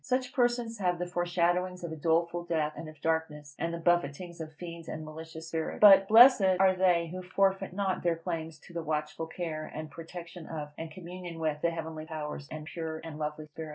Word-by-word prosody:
Such 255 0 -1
persons 240 -2 +1
have 180 -2 +1
the 180 - -2
foreshadowings 175 +1 0
of 170 - -4
a - - -4
doleful 170 +2 +1
death, 155 -3 0
and 160 - -7
of 155 -2 -14
darkness, 150 -3 -2
and 165 - -1
the 170 - -3
buffetings 170 0 0
of 155 -1 -6
fiends 170 0 -8
and 155 0 -5
malicious 160 +1 -8
spirits. 160 -1 -3
But, 195 -2 +9
blessed 220 -5 +8
are 190 -1 +5
they 175 -3 +3
who 185 - -4
forfeit 195 +1 +1
not 195 -1 -1
their 170 -1 +2
claims 165 -2 -4
to 175 - -15
the 170 - -2
watchful 155 +1 -2
care 160 -2 -5
and 155 0 -6
protection 170 +1 -9
of, 150 -2 -5
and 165 0 -6
communion 175 0 -8
with, 155 -2 -1
the 170 - +3
heavenly 160 -1 -5
powers, 150 -3 -5
and 155 -1 -7
pure 160 0 -5
and 160 -2 -7
lovely 150 0 -3
spirits. 155 +1 -8
165 Hz, 205 wpm, -30 LUFS, 155-180 Hz, -, But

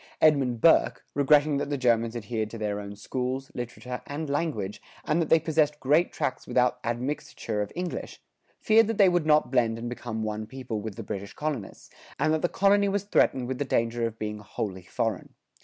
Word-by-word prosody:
Edmund 135 -7 +3
Burke, 165 - +4
regretting 145 +1 +4
that 140 - -2
the 145 - -1
Germans 115 -2 +2
adhered 110 -1 -3
to 115 - -8
their 105 -1 -2
own 100 0 -7
schools, 130 +5 -3
literature, 125 +1 -6
and 145 0 -4
language, 140 - -2 0.2
and 160 +3 +2
that 160 - -1
they 165 - +6
possessed 155 -2 +1
great 150 +6 +3
tracts 130 - -3
without 125 0 +2
admixture 120 -3 -3
of 105 - -4
English, 180 0 -5 0.4
feared 220 0 +5
that 225 -2 -2
they 195 -3 +7
would 175 -3 +1
not 150 -3 +4
blend 115 -3 +2
and 115 +1 -5
become 120 -2 -4
one 110 0 -3
people 125 -4 -5
with 110 -2 -6
the - - -6
British 100 0 -6
colonists, 145 -9 -5 0.3
and 155 - +2
that 160 - 0
the 175 - +1
colony 200 +1 +3
was 200 0 0
threatened 130 -10 +2
with 130 0 -3
the - - +1
danger 115 -3 0
of 115 -1 -8
being 105 -1 -4
wholly 100 -2 -5
foreign. 105 +2 -3
125 Hz, 195 wpm, -27 LUFS, 110-155 Hz, 0.4 s, they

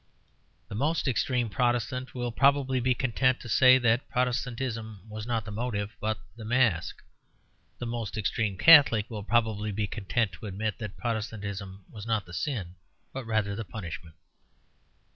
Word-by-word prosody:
The - - -9
most 145 +9 0
extreme 125 -1 +1
Protestant 125 +4 -1
will 120 -1 -2
probably 135 0 +3
be 125 +1 +2
content 130 +1 +1
to - - -9
say 130 +3 +7
that 120 0 +1
Protestantism 120 -4 -2
was 110 +1 -7
not 115 -3 -1
the 105 - -6
motive, 105 -2 -3
but 110 0 -1 0.2
the 115 - -9
mask. 110 -7 +1 0.7
The 120 - -5
most 115 -3 -4
extreme 105 -1 -1
Catholic 140 - +7
will 105 -2 -4
probably 110 -1 +1
be 105 +1 -1
content 105 +2 -1
to 90 +5 -9
admit 105 +3 -3
that 105 -3 -6
Protestantism 100 -4 -4
was 105 0 -10
not 110 -4 0
the 85 - -12
sin, 95 - -3 0.4
but 135 -2 -5
rather 110 -3 0
the 115 - -4
punishment. 85 -4 -8
110 Hz, 155 wpm, -28 LUFS, 105-125 Hz, 0.7 s, say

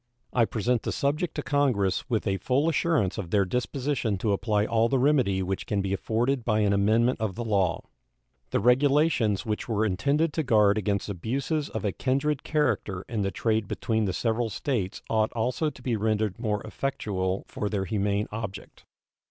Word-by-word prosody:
I 120 -2 +4
present 115 +2 0
the - - -3
subject 150 +4 -1
to - - -3
Congress 125 -8 +1
with 115 -3 0
a 95 -2 0
full 130 - +1
assurance 160 - +1
of 90 -5 -5
their 100 +1 +3
disposition 125 0 -1
to 105 +2 0
apply 105 +1 +1
all 115 +1 +2
the 135 - +2
remedy 125 -9 +2
which 95 +1 -3
can 105 - 0
be 95 0 -1
afforded 120 +6 0
by 110 -2 +1
an 100 -1 +3
amendment 110 +5 +2
of 105 -4 -1
the 120 - -3
law. 100 -6 +1 0.7
The - - +1
regulations 130 -2 +3
which 110 +1 -3
were 110 -1 +1
intended 140 - +1
to 160 - 0
guard 105 -6 +4
against 100 -1 -1
abuses 135 - -2
of 110 -1 -4
a 100 - +1
kindred 135 +5 0
character 125 - -1
in 110 -3 -2
the 100 - 0
trade 110 +2 0
between 110 +1 -1
the 95 - 0
several 115 +2 0
States 105 -3 -3
ought 110 -1 +1
also 125 +7 0
to 130 -3 -14
be 125 -3 0
rendered 110 -2 0
more 105 -3 -1
effectual 100 -6 -2
for 105 - -3
their 100 -2 -1
humane 100 0 0
object. 105 -3 -7
110 Hz, 185 wpm, -27 LUFS, 100-130 Hz, 0.7 s, I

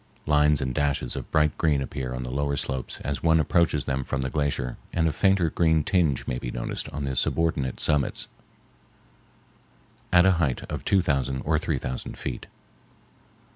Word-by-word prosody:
Lines 75 -1 +3
and 65 -1 -2
dashes 70 -3 -1
of - - -6
bright 75 -1 +2
green 75 -4 +2
appear 65 -2 -4
on 65 - -4
the 60 - -5
lower 70 +1 -1
slopes 65 -1 -3
as 70 -2 -3
one 80 -1 +4
approaches 80 -2 +2
them 65 -1 -1
from 65 - -3
the 65 0 -2
glacier, 70 -5 -1
and 80 -1 +1
a - - +1
fainter 95 -2 +2
green 80 -2 +2
tinge 80 -8 +1
may 60 - -2
be - - -5
noticed - - -4
on 75 0 -5
the 65 -1 -2
subordinate 70 -2 0
summits 75 -3 +1 1.8
at 90 0 +6
a 95 - +6
height 65 -6 0
of - - -4
two 95 -2 +3
thousand 65 -3 0
or 75 0 +2
three 80 -3 -1
thousand 65 0 -5
feet. 65 -3 -5
70 Hz, 175 wpm, -26 LUFS, 65-80 Hz, 1.8 s, at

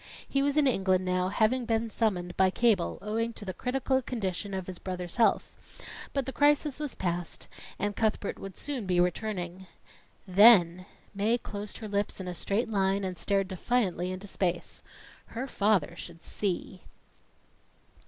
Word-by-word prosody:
He 275 - +1
was 285 +1 +1
in 300 - +5
England 190 -7 +2
now, 180 0 +1
having 230 +5 +2
been 225 0 0
summoned 180 -7 -1
by 190 0 +4
cable, 205 -3 +2
owing 225 +2 -1
to 210 - -8
the 185 - -4
critical 265 +3 0
condition 205 -5 -3
of 190 -1 -3
his 185 -1 -7
brother's 180 0 -5
health, 230 - +3 0.6
but 275 -2 -1
the 265 - -4
crisis 295 0 +3
was 295 -3 -3
past, 175 -2 -3 0.3
and 205 0 -2
Cuthbert 215 -2 -1
would 195 -1 -8
soon 265 -8 -4
be 180 -1 +2
returning. 180 0 -1 0.6
Then 185 -3 +6 0.3
Mae 215 +4 +2
closed 205 -3 -6
her 220 - -6
lips 200 -1 -1
in 190 - -5
a 180 - -3
straight 200 +7 0
line 195 -2 +1
and 185 -1 -3
stared 195 +1 0
defiantly 185 -2 0
into 185 +2 -6
space. 180 -3 -2 0.5
Her 240 +3 -4
father 205 - +1
should 170 -1 -9
see! 185 -1 -3
200 Hz, 160 wpm, -29 LUFS, 185-230 Hz, 0.6 s, Then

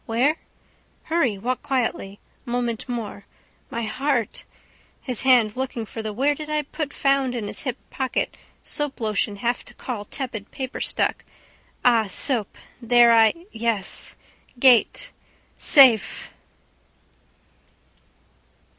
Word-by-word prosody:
Where? 255 +8 +2 0.7
Hurry. 275 -11 0
Walk 250 +6 -2
quietly. 230 -6 -2 0.2
Moment 240 -1 -3
more. 220 -4 -5 0.4
My 235 - -3
heart. 255 0 -1 0.5
His 250 -4 -4
hand 245 -5 +4
looking 255 -3 -3
for 225 - -7
the 215 -1 -4
where 270 +7 +1
did 300 +1 -8
I 305 0 0
put 295 0 -5
found 275 -2 +1
in 230 -3 -3
his - - -4
hip 255 -4 -3
pocket 260 -1 -2 0.3
soap 295 -2 -2
lotion 215 -2 -1
have 240 +4 -2
to - - -14
call 225 -5 -5
tepid 230 -4 -4
paper 260 -1 -5
stuck. - - 0 0.6
Ah 230 -3 +4
soap 220 +2 -1 0.2
there 240 0 +6
I 230 +10 +4
yes. 225 -3 -2 0.4
Gate. 260 - +4 0.5
Safe! 260 -7 +5
245 Hz, 120 wpm, -23 LUFS, 220-270 Hz, 0.7 s, there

